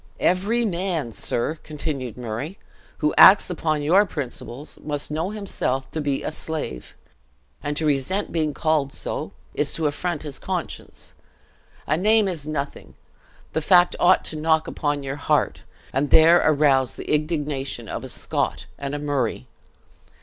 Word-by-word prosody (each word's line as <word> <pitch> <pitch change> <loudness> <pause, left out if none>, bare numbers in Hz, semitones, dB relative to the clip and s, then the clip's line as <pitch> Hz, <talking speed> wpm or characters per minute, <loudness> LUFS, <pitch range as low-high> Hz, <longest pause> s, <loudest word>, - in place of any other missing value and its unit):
"Every 205 +7 +2
man, 175 - -1
sir," 135 +8 -2
continued 140 -6 -4
Murray, 125 - -5 0.5
"who 150 - +3
acts 190 -1 +8
upon 155 -3 -1
your 180 +7 +5
principles, 140 -2 -6
must 145 -1 -3
know 160 +4 -1
himself 190 -11 -2
to 155 - -2
be 140 -2 -1
a - - -2
slave; 155 - -5 0.7
and 145 0 -2
to 160 - +1
resent 150 +8 0
being 155 -3 0
called 150 -2 0
so, - - -4 0.2
is - - 0
to 160 - -1
affront 155 +2 -2
his 145 -3 -5
conscience. 185 -3 -5 0.7
A 155 - +1
name 215 +3 +4
is 160 -6 -3
nothing, 145 -2 -5 0.6
the 160 - 0
fact 175 +2 +5
ought 185 +1 +4
to - - -2
knock 160 +1 +2
upon 145 -1 -2
your 135 +1 -4
heart, 145 - 0 0.3
and 135 +2 0
there 165 +4 +7
arouse 140 -4 +3
the - - -8
indignation 150 -3 -2
of - - -5
a - - -7
Scot - - -1
and 140 +1 -3
a - - -1
Murray. 145 - -1
155 Hz, 150 wpm, -23 LUFS, 140-170 Hz, 0.7 s, acts